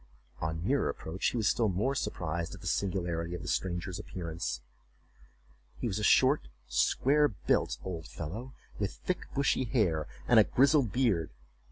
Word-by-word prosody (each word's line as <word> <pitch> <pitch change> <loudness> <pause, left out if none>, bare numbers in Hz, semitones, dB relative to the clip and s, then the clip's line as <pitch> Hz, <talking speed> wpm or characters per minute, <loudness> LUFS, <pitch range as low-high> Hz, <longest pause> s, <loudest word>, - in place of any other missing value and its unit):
On 80 +2 -3
nearer 140 +5 +2
approach 80 +6 -3
he - - -3
was 110 -3 +1
still 115 -3 +2
more 105 +9 0
surprised 85 - -3
at - - -13
the - - -11
singularity 85 -3 -1
of 90 - -6
the - - -7
stranger's 90 0 -2
appearance. 85 -7 -4 1.2
He - - -4
was 110 -3 -1
a - - -3
short 60 - +4 0.2
square 150 - +3
built 95 -10 0
old 85 -4 -5
fellow, 110 +12 -6 0.2
with 100 -2 -1
thick 185 - -2
bushy 140 -1 +2
hair, 95 - +1 0.2
and 120 - +7
a - - +8
grizzled 135 0 +3
beard. 100 - +1
95 Hz, 160 wpm, -31 LUFS, 85-120 Hz, 1.2 s, a